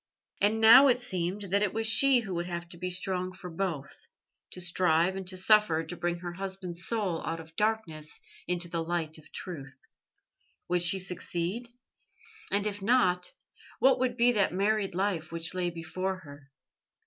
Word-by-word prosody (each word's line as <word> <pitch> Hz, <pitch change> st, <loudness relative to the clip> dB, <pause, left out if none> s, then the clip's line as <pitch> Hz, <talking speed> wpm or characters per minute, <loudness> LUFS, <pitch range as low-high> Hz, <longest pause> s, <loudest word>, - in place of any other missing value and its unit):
And 210 Hz, +2 st, +3 dB
now 235 Hz, +5 st, +9 dB
it 250 Hz, -2 st, +4 dB
seemed 190 Hz, -4 st, -2 dB
that 200 Hz, +1 st, +3 dB
it 210 Hz, -1 st, 0 dB
was 225 Hz, 0 st, -1 dB
she 245 Hz, +4 st, +5 dB
who 195 Hz, -5 st, -6 dB
would 175 Hz, 0 st, -3 dB
have 170 Hz, -1 st, -5 dB
to 175 Hz, -, -10 dB
be 180 Hz, +1 st, -3 dB
strong 185 Hz, 0 st, -1 dB
for 180 Hz, -1 st, -9 dB
both; 165 Hz, -5 st, -5 dB, 0.4 s
to -, -, -7 dB
strive 175 Hz, 0 st, +2 dB
and 190 Hz, -1 st, -6 dB
to 185 Hz, 0 st, -1 dB
suffer 190 Hz, -4 st, +4 dB
to 160 Hz, +2 st, -7 dB
bring 175 Hz, 0 st, -2 dB
her 175 Hz, -1 st, -5 dB
husband's 190 Hz, -2 st, -6 dB
soul 200 Hz, -8 st, -1 dB
out 165 Hz, -, -3 dB
of 165 Hz, 0 st, -13 dB
darkness 195 Hz, -8 st, -2 dB, 0.3 s
into 175 Hz, 0 st, 0 dB
the 170 Hz, -1 st, -3 dB
light 165 Hz, -2 st, -3 dB
of 155 Hz, -, -19 dB
truth. 135 Hz, -7 st, -7 dB, 0.9 s
Would 180 Hz, 0 st, +2 dB
she 175 Hz, +2 st, +6 dB
succeed? 185 Hz, +4 st, -4 dB, 0.8 s
And 200 Hz, +1 st, 0 dB
if 205 Hz, -1 st, -3 dB
not, 185 Hz, -5 st, +2 dB, 0.4 s
what 265 Hz, 0 st, +4 dB
would 250 Hz, -1 st, 0 dB
be 240 Hz, 0 st, +5 dB
that 205 Hz, -4 st, +2 dB
married 200 Hz, -1 st, 0 dB
life 185 Hz, -5 st, -1 dB
which 165 Hz, 0 st, -2 dB
lay 180 Hz, -1 st, -1 dB
before 185 Hz, +3 st, -4 dB
her? 145 Hz, -3 st, -14 dB
185 Hz, 175 wpm, -29 LUFS, 170-205 Hz, 0.9 s, now